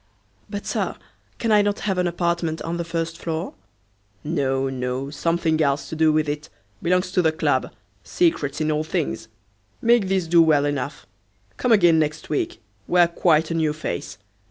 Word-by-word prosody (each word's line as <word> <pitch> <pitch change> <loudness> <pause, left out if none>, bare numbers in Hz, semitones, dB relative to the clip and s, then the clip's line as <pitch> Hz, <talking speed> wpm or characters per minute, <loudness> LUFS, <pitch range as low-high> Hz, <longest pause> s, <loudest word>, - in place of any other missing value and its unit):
"But, 205 0 -5
Sir, - - -2 0.4
can 230 - -1
I 210 -1 +6
not 205 0 -1
have 195 -3 -1
an 180 - +2
apartment 170 -2 -1
on 170 +1 -3
the 170 - -2
first 165 0 -3
floor?" 165 0 -3 0.7
"No, 135 -4 0
no, 130 +1 -3
something 160 +1 0
else 140 -1 0
to - - -5
do 160 0 +4
with 155 0 +1
it; 150 +1 -4 0.3
belongs 180 +2 +1
to 185 - +2
the 160 -2 +3
club; 160 - 0 0.3
secrets 155 - 0
in 155 0 +1
all 155 0 0
things! 155 -10 -3 0.5
Make 235 -4 +3
this 190 -2 +1
do 170 +1 +5
well 150 -3 +4
enough. 145 -1 -3 0.5
Come 250 - 0
again 175 -7 +5
next 155 0 -2
week; 145 - -1 0.3
wear 175 -1 +5
quite 165 -2 +2
a - - +1
new 160 -2 +1
face. 105 - -5
160 Hz, 175 wpm, -23 LUFS, 150-175 Hz, 0.7 s, I